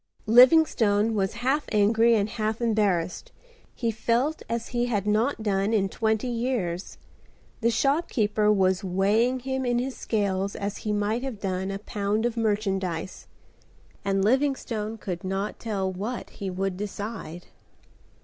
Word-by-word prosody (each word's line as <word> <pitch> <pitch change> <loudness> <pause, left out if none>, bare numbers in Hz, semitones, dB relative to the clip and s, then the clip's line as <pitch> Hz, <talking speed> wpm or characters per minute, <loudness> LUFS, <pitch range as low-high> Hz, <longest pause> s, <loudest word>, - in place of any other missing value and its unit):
Livingstone 230 -4 +5
was 195 -3 0
half 285 +3 +2
angry 225 +2 +4
and 205 -2 +1
half 215 0 -2
embarrassed. 205 -7 0 0.4
He 230 -2 -1
felt 240 +7 0
as 230 0 -3
he 240 0 0
had 205 -5 -1
not 220 +3 +1
done 200 +1 +1
in 195 -3 +2
twenty 220 +2 0
years. 230 -7 -2 0.6
The 235 - +2
shopkeeper 225 -5 +1
was 190 -2 +2
weighing 210 +7 +1
him 265 +1 -2
in 245 -1 +1
his 255 +2 -2
scales 200 -2 -1
as 200 +1 -4
he 215 - -3
might 210 +3 0
have 260 -6 -5
done 190 -1 -2
a 195 - -3
pound 205 +2 -2
of 240 -1 -1
merchandise, 195 -6 -2 0.8
and 195 -1 +1
Livingstone 230 -4 0
could 180 -5 -5
not 195 +2 -3
tell 195 -4 -2
what 215 +7 -5
he 195 - -5
would 185 0 -2
decide. 205 -4 -6
215 Hz, 140 wpm, -26 LUFS, 195-235 Hz, 0.8 s, Livingstone